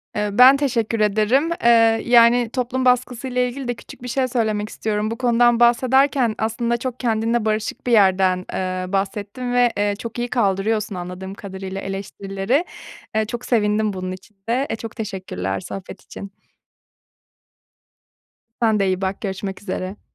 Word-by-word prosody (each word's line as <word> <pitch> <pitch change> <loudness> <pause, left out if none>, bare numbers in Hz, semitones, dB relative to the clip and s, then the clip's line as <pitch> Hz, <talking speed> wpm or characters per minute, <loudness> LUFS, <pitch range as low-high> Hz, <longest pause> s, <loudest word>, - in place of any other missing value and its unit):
Eee, 210 0 0
ben 260 +2 +8
teşekkür 235 -5 -1
ederim, 215 +9 +2
eee, 235 - +5 0.4
yani, 240 -1 +5
toplum 255 0 -1
baskısıyla 250 0 +1
ilgili 250 +1 -3
de 245 - 0
küçük 240 - -13
bir - - -5
şey 255 +1 0
söylemek 215 -4 -1
istiyorum. 215 0 -2
Bu 230 - -4
konudan 240 -1 +3
bahsederken 255 0 +3
aslında 235 +2 -1
çok 255 +1 -5
kendinle 230 -1 0
barışık 215 +3 -2
bir - - +1
yerden, 190 -3 +3
eee, 185 0 -2
bahsettin 205 +5 -2
ve, 245 -1 +4
eee, 205 0 +1
çok 230 +1 -6
iyi 240 - -1
kaldırıyorsun 210 -2 0
anladığım 180 +2 -6
kadarıyla 195 -1 -7
eleştirileri. 195 - -2 0.5
Eee, 220 0 +2
çok 240 +3 -6
sevindim 210 -2 +1
bunun 185 -1 -4
için 185 +3 -11
de. 260 +4 +1
E, - - -1
çok 225 0 -8
teşekkürler 185 - -4
sohbet 190 - -8
için. 200 - -10 2.3
Sen 220 -2 +3
de 195 - +2
iyi 185 0 -1
bak, 190 0 -2
görüşmek 190 -1 -5
üzere. 185 0 -5
220 Hz, 150 wpm, -21 LUFS, 195-245 Hz, 2.3 s, ben